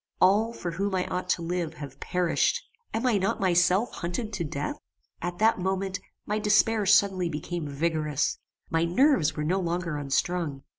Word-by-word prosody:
All, 205 +5 +4
for 180 -7 -5
whom 195 +3 -1
I 180 - 0
ought 180 0 -3
to 170 - +1
live, 170 -1 -2
have 145 -3 -9
perished. 180 - +1 0.3
Am 225 +3 -2
I 230 -5 +3
not 190 - 0
myself 185 +4 +3
hunted 210 +6 -4
to 190 -4 -2
death? 145 -1 -4 0.4
At 175 +1 -3
that 220 -1 +3
moment, 190 0 -1 0.3
my 210 +1 -1
despair 210 0 +3
suddenly 190 -4 +4
became 165 +1 -4
vigorous. 150 0 -1 0.3
My 165 0 +2
nerves 175 - +3
were 150 - -2
no 180 +5 +1
longer 170 -3 -2
unstrung. 145 +1 -1
180 Hz, 165 wpm, -27 LUFS, 165-200 Hz, 0.4 s, All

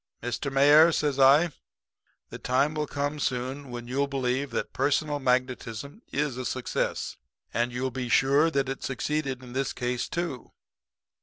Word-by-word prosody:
"'Mr. 120 +3 -3
Mayor,' 145 +4 +7
says 145 -3 0
I, 145 +5 +6 0.8
'the - - -7
time 135 +4 +1
will 150 -1 -2
come 145 +1 -2
soon 130 +1 -2
when 120 -1 -7
you'll 140 +3 0
believe 135 0 -1
that - - -3
personal 145 +2 +1
magnetism 130 - -1
is 140 -3 -1
a 130 - -3
success. 130 0 -2 0.4
And 120 +1 0
you'll 130 +2 -2
be 125 -1 -4
sure 140 +6 +4
that 140 -4 0
it 135 - -4
succeeded 135 -1 -2
in 125 -1 -10
this 135 0 -1
case, 125 0 -2
too.' 170 -8 -4
135 Hz, 155 wpm, -27 LUFS, 125-145 Hz, 0.8 s, Mayor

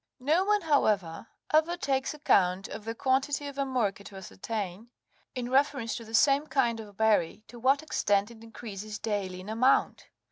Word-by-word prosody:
No 310 +8 +2
one, 420 0 +2
however, 215 - +1 0.3
ever 320 +3 +3
takes 265 -5 -1
account 190 -9 +2
of 215 0 -8
the 225 0 -4
quantity 270 +3 0
of 280 -1 -7
amurca 250 -8 -1
to 200 - -11
ascertain, 195 +2 -6 0.5
in 250 -1 -4
reference 270 -4 +1
to 235 - -8
the 225 0 -4
same 280 +4 +4
kind 235 -6 +1
of 205 -3 -11
berry, 215 -4 +2
to 240 - -11
what 270 +5 +2
extent 205 -8 +1
it 225 -1 -14
increases 215 -2 -8
daily 200 -4 -3
in 185 - -12
amount. 230 +5 +1
230 Hz, 170 wpm, -28 LUFS, 205-275 Hz, 0.5 s, same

